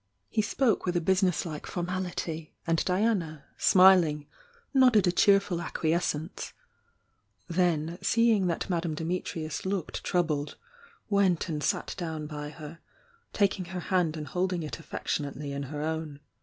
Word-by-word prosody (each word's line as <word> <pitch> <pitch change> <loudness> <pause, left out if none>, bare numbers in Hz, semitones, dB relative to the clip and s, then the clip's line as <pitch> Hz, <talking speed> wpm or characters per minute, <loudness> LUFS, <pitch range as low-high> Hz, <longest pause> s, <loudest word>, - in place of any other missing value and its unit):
He 215 - +2
spoke 225 +2 +1
with 180 0 +1
a - - +3
busines^e 180 -3 0
formality, 175 -3 -4
and 165 -1 +1
Di 185 +2 +1
ana, 170 -10 0 0.2
snuling, 180 -6 +5 0.5
nodded 250 -7 +5
a 175 - +3
cheerful 195 -1 +3
acquiescence, 165 -1 -2 0.5
— - - -43
then 170 -1 +1
seeing 225 -5 +3
that 170 - -2
Madame 170 -4 -1
Dimitrius 160 -2 -3
looked 190 -3 -3
troubled, 155 -5 0 0.5
went 195 -5 +2
and 150 -2 -3
sat - - -1
down 160 -3 -4
by 150 -1 -6
her, 155 +1 -10 0.5
taking 195 -2 +1
her 180 +1 -5
hand 175 -3 0
and 150 - -5
hold 185 +1 0
ing 175 -2 -2
it 155 - -6
affectionately 145 -2 -4
in 140 0 -3
her 150 0 -4
own. 160 -2 -3
170 Hz, 140 wpm, -28 LUFS, 155-185 Hz, 0.5 s, snuling